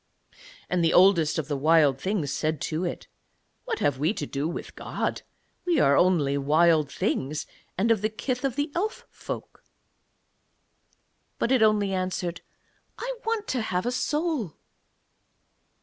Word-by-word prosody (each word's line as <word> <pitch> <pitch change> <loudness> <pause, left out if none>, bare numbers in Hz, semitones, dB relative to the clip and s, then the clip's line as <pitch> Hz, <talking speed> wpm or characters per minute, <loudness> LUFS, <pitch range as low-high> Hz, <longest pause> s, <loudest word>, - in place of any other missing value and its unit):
And 180 -1 0
the 165 - +3
Oldest 175 -4 +5
of 155 -3 -2
the 145 - -1
Wild 145 -2 +3
Things 190 -7 -1
said 155 -1 -1
to 160 +2 -2
it: 175 - -4 0.6
'What 465 -3 -2
have 135 - 0
we 160 +9 +1
to 145 - -3
do 140 +2 -2
with 170 - -6
God? - - -3 0.4
We 345 -4 +2
are 140 - +5
only 145 -6 +3
Wild 155 +1 +3
Things, 145 +3 -2 0.3
and 220 +5 +2
of 220 -4 +2
the 215 - +1
kith 250 +4 -3
of 270 -3 -1
the 290 +1 -1
Elf 420 +6 -2
folk.' - - -8 1.7
But 235 - 0
it 260 -3 +4
only 210 -2 +3
answered, 185 -2 -2 0.6
'I - - -3
want 450 -2 -1
to 255 - 0
have 180 -4 -2
a 245 - 0
soul.' 295 - -1
180 Hz, 150 wpm, -26 LUFS, 155-245 Hz, 1.7 s, Oldest